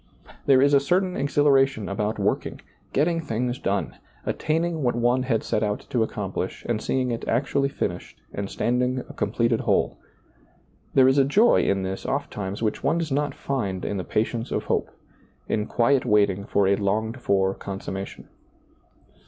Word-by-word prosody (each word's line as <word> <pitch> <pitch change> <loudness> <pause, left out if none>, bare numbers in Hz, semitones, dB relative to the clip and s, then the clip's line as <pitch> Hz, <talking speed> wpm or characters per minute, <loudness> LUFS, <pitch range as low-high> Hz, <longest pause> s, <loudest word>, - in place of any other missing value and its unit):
There 135 -1 +6
is 145 0 +4
a 140 - +7
certain 180 +6 +1
exhilaration 135 -5 +2
about 105 +2 -2
working, - - -1 0.3
getting 165 +4 +1
things 125 -3 -2
done, 100 0 -2 0.3
attaining 160 +1 -1
what 120 -3 +1
one 120 +2 +2
had 125 -4 0
set 105 - -1
out 105 -1 -2
to 120 - +1
accomplish 100 -4 -3
and 115 -2 -1
seeing 130 -1 0
it 115 - -3
actually 140 +3 +1
finished - - -4
and 100 -1 -4
standing 125 +1 0
a - - -10
completed 115 -1 0
whole. - - +1 1.0
There 130 -1 +7
is 135 +2 +4
a - - +6
joy 210 - +4
in 100 -1 +1
this 95 +1 -4
ofttimes 105 -7 -3
which 110 - -1
one 165 - +2
does 165 -3 -2
not 145 0 0
find 100 -9 -3
in 100 - -2
the 95 - -3
patience 115 +5 -1
of - - -1
hope, - - -1 0.6
in 105 0 -1
quiet 125 +3 +2
waiting 100 -2 +2
for 100 -1 +2
a 100 +1 +3
longed 110 +4 -1
for 95 -2 +2
consummation. 95 0 -6
120 Hz, 165 wpm, -25 LUFS, 105-140 Hz, 1.0 s, a